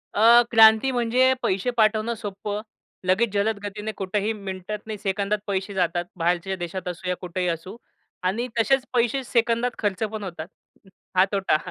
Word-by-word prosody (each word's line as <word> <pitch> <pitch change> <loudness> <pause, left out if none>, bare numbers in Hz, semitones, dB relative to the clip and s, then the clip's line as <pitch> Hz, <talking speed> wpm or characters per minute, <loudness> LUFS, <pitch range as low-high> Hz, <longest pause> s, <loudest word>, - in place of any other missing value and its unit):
अ, 230 +3 +7
क्रांती 220 +3 +7
म्हणजे 250 +1 +3
पैसे 190 +5 0
पाठवणं 220 +1 +2
सोपं. 205 0 -5 0.4
लगेच 200 +5 +2
जलद 205 +1 0
गतीने 210 +1 -4
कुठेही 200 +3 -1
मिनिटात 200 +1 -6
सेकंदात 200 +1 0
पैसे 195 0 -2
जातात. 175 -1 0
बाहेरच्या 180 +3 0
देशात 180 +1 -5
असू 180 +1 -5
या 180 - +1
कुठेही 180 0 -2
असू 170 +4 -5 0.5
आणि 215 +7 0
तसेच 265 +2 +3
पैसे 245 +2 +1
सेकंदात 235 0 +1
खर्च 205 0 -1
पण 215 -2 -5
होतात. 170 -3 -6 0.7
हा 185 - +6
तोटा. 195 -6 +2
205 Hz, 150 wpm, -24 LUFS, 185-225 Hz, 0.7 s, अ